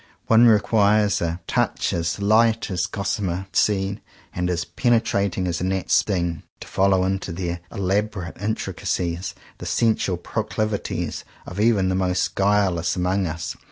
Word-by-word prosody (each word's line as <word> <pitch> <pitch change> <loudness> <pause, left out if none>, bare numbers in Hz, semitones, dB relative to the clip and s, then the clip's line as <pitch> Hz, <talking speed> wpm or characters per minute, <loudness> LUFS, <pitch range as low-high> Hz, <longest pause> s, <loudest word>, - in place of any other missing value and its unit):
One 115 +1 +6
requires 105 -1 +3
a 85 +1 -2
touch - - 0
as 85 0 -1
light 110 +2 +3
as 90 -1 0
a - - -20
gossamer 95 -2 -2
seed, 100 0 +1 0.3
and 90 0 -1
as 85 -1 -1
penetrating 100 -6 +1
as 85 -1 -2
a - - -1
gnat's 95 0 -1
sting, 85 -5 +1 0.2
to - - -9
follow 95 -1 +2
into 95 -1 -2
their 85 0 -3
elaborate 100 -1 -2
intricacies 90 -4 -2 0.2
the - - -6
sensual 110 -5 +1
pro 110 +5 -3
clivities 110 -1 -3 0.2
of 90 - -7
even 105 -4 +3
the - - +1
most 95 -1 0
guileless 95 -4 +1
among 90 +1 0
us. 80 0 -4
95 Hz, 150 wpm, -23 LUFS, 90-105 Hz, 0.3 s, One